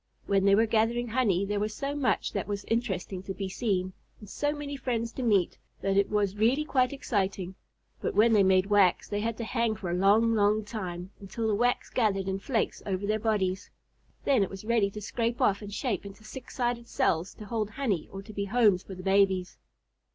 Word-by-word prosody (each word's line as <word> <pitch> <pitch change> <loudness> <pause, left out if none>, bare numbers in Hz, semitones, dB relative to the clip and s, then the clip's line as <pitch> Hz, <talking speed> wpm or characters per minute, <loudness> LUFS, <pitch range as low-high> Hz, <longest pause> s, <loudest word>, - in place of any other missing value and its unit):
When 195 -1 +2
they 200 0 +6
were 225 +2 +4
gathering 230 +2 +1
honey 210 -6 +2
there 205 +1 -1
was 215 +1 -2
so 280 +3 -3
much 285 -3 0
that - - -2
was 200 -1 -4
interesting 195 -5 -2
to 190 0 -6
be 195 - -3
seen, 185 -2 -1 0.3
and 210 - -12
so 290 +8 -1
many 290 -1 -5
friends 235 -4 -2
to 260 - -6
meet, 205 -7 +2 0.2
that 195 0 0
it 200 0 +3
was 205 -2 0
really 250 +8 +2
quite 255 -4 +2
exciting; 195 -9 -2 0.5
but - - -2
when 225 +2 +5
they 210 - +6
made 190 -1 +4
wax 200 -3 +3
they 205 - -2
had 225 +1 -2
to 235 - -4
hang 230 -1 0
for 180 -4 -4
a - - 0
long, 210 +5 +4
long 210 0 +2
time, 185 -4 -5
until 210 +3 -4
the 215 - +1
wax 245 +4 +1
gathered 195 -5 +1
in 190 0 -1
flakes 225 +1 -1
over 195 0 -1
their 215 +1 0
bodies. 200 -4 -1 0.6
Then 270 -6 +4
it 195 - +1
was 195 +1 -9
ready 225 -3 +2
to 210 +1 -8
scrape 230 +3 -2
off 200 0 +2
and 205 -1 -8
shape 210 -2 -2
into 200 +1 -11
six 255 +5 -10
sided 240 -1 -1
cells 165 -4 0
to 215 - -10
hold 215 -1 -2
honey 215 - -2
or 195 0 -7
to 215 +1 -11
be 200 0 -2
homes 205 -3 +3
for 190 - -9
the 185 - -9
babies. 190 -1 +2
210 Hz, 215 wpm, -28 LUFS, 195-230 Hz, 0.6 s, they